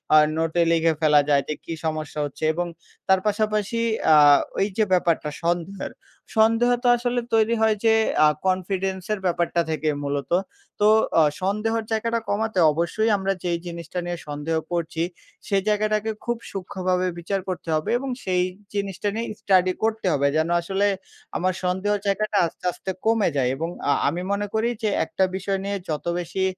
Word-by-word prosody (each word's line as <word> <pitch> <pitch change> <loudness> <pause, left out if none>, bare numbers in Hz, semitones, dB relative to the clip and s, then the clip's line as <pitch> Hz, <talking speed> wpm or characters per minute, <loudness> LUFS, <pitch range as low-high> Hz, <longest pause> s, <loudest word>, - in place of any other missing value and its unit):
আ - - +9 0.2
নোটে 165 +1 +1
লিখে 165 0 +3
ফেলা 150 -2 +5
যায় 140 -1 +4
যে - - -1
কী 165 - -4
সমস্যা 155 -1 -3
হচ্ছে? 145 - -8
এবং 175 +2 -2 0.4
তার 190 0 +5
পাশাপাশি 215 +1 0 0.4
আ - - +8 0.4
ওইযে 200 +2 +1
ব্যাপারটা 170 -4 +2
সন্দেহের। 175 +3 -2 0.5
সন্দেহ 225 +2 +4
তো - - +2
আসলে 245 +1 -1
তৈরি 225 +1 +3
হয় 220 -1 +4
যে 225 - +6 0.3
আ - - +7 0.2
কনফিডেন্সের 190 +2 -1
ব্যাপারটা 170 -1 +1
থেকেই 155 -1 0
মূলত। 140 -1 -3 0.5
তো 210 - +4 0.3
অ - - +7 0.2
সন্দেহর 215 +4 0
জায়গাটা 230 +1 0
কমাতে 220 -1 0
অবশ্যই 170 +8 0
আমরা 195 0 0
যেই 175 -1 0
জিনিসটা 170 +1 -5
নিয়ে 175 0 -3
সন্দেহ 150 +2 -3 0.2
করছি, 165 -1 -1 0.4
সেই 195 -1 +2
জায়গাটাকে 215 +1 +1
খুব 240 0 -1
সূক্ষ্মভাবে 185 -1 -1
বিচার 195 +4 -2
করতে 180 -2 -5
হবে। 155 - -2
এবং 270 +1 -4
সেই 180 -1 +1 0.3
জিনিসটা 200 -1 -3
নিয়ে 230 +1 -2
স্টাডি 185 -2 +3
করতে 220 -1 0
হবে 140 -1 +2
যেন 160 +1 +1
আসলে 195 +3 0 0.5
আমার 185 +1 0
সন্দেহর 190 +3 0
জায়গাটা 210 +1 0
আস্তে, 165 - -8
আস্তে 190 - -5
কমে 225 -3 +3
যায়। 125 -2 +2
এবং 165 +4 -3 0.2
আ - - +5 0.2
আমি 165 +5 -1
মনে 205 +1 -1
করি 220 +2 +1
যে 215 - +2 0.2
একটা 190 - -1
বিষয় 195 +1 -2
নিয়ে 200 0 -2
যত 150 -1 -3
বেশি 175 +2 -3
190 Hz, 165 wpm, -24 LUFS, 170-215 Hz, 0.5 s, আ